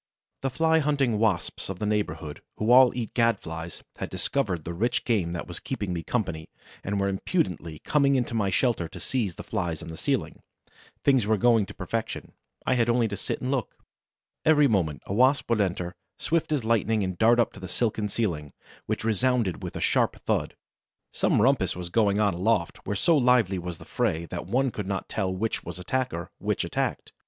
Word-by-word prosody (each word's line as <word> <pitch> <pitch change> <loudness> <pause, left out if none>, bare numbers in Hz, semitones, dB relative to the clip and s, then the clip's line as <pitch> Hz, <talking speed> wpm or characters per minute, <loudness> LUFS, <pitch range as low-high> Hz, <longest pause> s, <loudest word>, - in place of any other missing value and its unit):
The 135 - 0
Fly 160 +5 +3
hunting 140 -7 +1
Wasps 105 -6 0
of 95 - -4
the 105 - -3
neighborhood, 80 -8 -2 0.2
who 110 +3 +1
all 130 0 +8
eat 120 -3 -4
Gad 115 -1 +3
flies, 80 +1 -7
had - - -4
discovered 100 - -1
the 85 - -5
rich 120 +8 0
game 95 -8 +1
that 85 - -4
was 85 - -6
keeping 105 -8 -3
me 85 - -2
company 80 -8 -2 0.3
and 100 +1 -1
were 100 - +1
impudently 95 - -1
coming 140 -2 +3
into 125 -2 0
my 105 -4 +1
shelter 100 -3 +1
to - - -10
seize 110 -10 -2
the - - -8
Flies 85 -3 -3
on - - -8
the 80 - -7
ceiling. - - -2 0.6
Things 130 -7 +3
were 110 0 +3
going 115 -1 +4
to - - -10
perfection: 110 +5 -4 0.3
I - - +3
had 120 -2 +2
only 120 -1 +3
to 100 - -3
sit - - -3
still - - -7
and 130 - 0
look. 130 -7 -2 0.7
Every 150 -2 +5
moment 85 - 0
a - - -4
Wasp 130 +6 +3
would 110 -2 +3
enter, 90 -2 -1 0.2
swift 165 -1 0
as 140 -7 0
lightning, 110 -1 +2
and 95 -1 -2
dart 115 +6 +4
up 120 - +2
to - - -11
the 95 - -7
silken 110 0 -1
ceiling, 85 -10 -2 0.3
which - - -2
resounded 115 -3 +1
with - - -6
a - - -3
sharp - - +2
thud. - - -1 0.6
Some - - +2
rumpus 120 -9 +2
was 90 -1 -6
going 105 0 +2
on 105 -3 +3
aloft, 90 0 +1
where 100 - -1
so 165 - +3
lively 125 -8 +3
was 90 -1 -5
the - - -13
fray 80 +1 -1
that 85 -1 -5
one 130 +5 +1
could 105 -4 -5
not 95 -1 -3
tell 95 -3 -1
which 105 +4 -2
was - - -7
attacker, 90 -2 -2
which - - -1
attacked. - - -2
105 Hz, 205 wpm, -27 LUFS, 90-125 Hz, 0.7 s, all